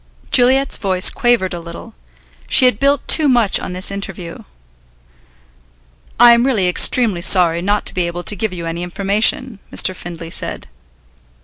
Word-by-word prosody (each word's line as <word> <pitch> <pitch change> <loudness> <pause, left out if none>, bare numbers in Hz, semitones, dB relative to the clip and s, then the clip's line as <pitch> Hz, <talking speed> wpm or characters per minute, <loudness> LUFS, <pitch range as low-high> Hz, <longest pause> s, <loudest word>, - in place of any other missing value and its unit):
Juliet's 265 +2 +1
voice 185 -2 +1
quavered 240 -7 -1
a 175 - -6
little. 170 +7 -12 0.5
She 260 - +4
had 250 -4 +2
built 280 0 -1
too 310 -2 +4
much 240 -6 +2
on - - -8
this 185 +2 -2
interview. 195 -3 -8 1.8
"I 240 0 +7
am 235 0 +1
really 230 -9 -1
extremely 195 +1 +2
sorry 170 -2 +3
not 205 +3 -2
to - - -1
be 180 -2 -2
able 175 +1 -7
to 205 - +2
give 215 +1 -4
you 175 -2 -8
any 165 +1 -6
information," 200 +5 -1
Mr. 185 - +1
Findlay 170 -2 -10
said. - - -5
195 Hz, 155 wpm, -15 LUFS, 175-240 Hz, 1.8 s, I